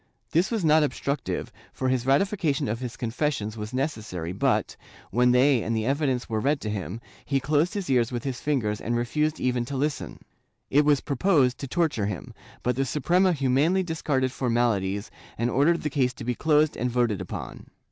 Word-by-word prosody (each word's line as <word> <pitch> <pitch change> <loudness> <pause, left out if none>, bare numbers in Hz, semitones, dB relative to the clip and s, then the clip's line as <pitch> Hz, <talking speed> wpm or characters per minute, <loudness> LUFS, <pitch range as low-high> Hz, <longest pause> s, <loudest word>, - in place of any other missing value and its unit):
This 175 +5 +2
was 220 -7 -1
most 155 0 +5
obstructive, 140 -1 -2 0.2
for 130 - -3
his 130 -1 0
ratification 160 - +1
of 110 +2 -2
his 125 -2 -6
confessions 115 -2 -2
was 105 0 -6
necessary 110 - -3
but, 95 - 0 0.4
when 125 +1 +3
they 130 0 +4
and 115 +1 -1
the 110 - -1
evidence 135 -2 0
were 110 -1 -1
read 140 +5 +1
to 105 - -3
him, 105 +1 -4 0.2
he 140 -1 0
closed 150 +6 +1
his 200 -3 -3
ears 125 -3 +2
with 120 0 -3
his 135 -3 -4
fingers 110 -8 -1
and 120 +1 -1
refused 150 +6 0
even 125 -1 0
to 135 +2 -4
listen. 145 +1 -2 0.5
It 145 +2 +4
was 145 -2 +4
proposed 140 -3 +2
to 140 - -5
torture 150 - 0
him, 100 -5 -6 0.3
but 125 0 +1
the 135 +2 0
Suprema 175 +8 +2
humanely 150 +5 +2
discarded 145 -6 -1
formalities 115 -6 0 0.3
and 120 +2 0
ordered 160 +7 +2
the 150 - 0
case 130 -3 +1
to - - -9
be 125 - 0
closed 150 +3 +2
and 125 +2 -1
voted 120 -5 0
upon. 95 - -7
130 Hz, 190 wpm, -26 LUFS, 120-150 Hz, 0.5 s, most